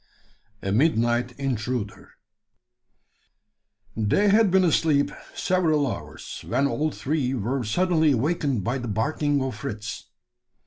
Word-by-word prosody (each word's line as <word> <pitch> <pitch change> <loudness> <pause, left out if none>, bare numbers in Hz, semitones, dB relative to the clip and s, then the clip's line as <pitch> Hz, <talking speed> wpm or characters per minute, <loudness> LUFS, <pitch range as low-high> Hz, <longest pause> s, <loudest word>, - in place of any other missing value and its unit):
A 95 - -1
MIDNIGHT 120 -1 +2
INTRUDER. 120 -6 -3 1.8
They 110 - +2
had 210 0 +5
been 190 +1 +4
asleep 155 -4 +2 0.2
several 160 -5 +2
hours, 130 - -6
when 130 +5 +1
all 150 +2 0
three 140 -3 -1
were 125 +3 -2
suddenly 160 - +2
awakened 140 - 0
by 125 +5 -1
the 125 - -5
barking 140 +6 0
of 130 -3 -3
Fritz. 105 -1 -6
135 Hz, 110 wpm, -25 LUFS, 115-155 Hz, 1.8 s, had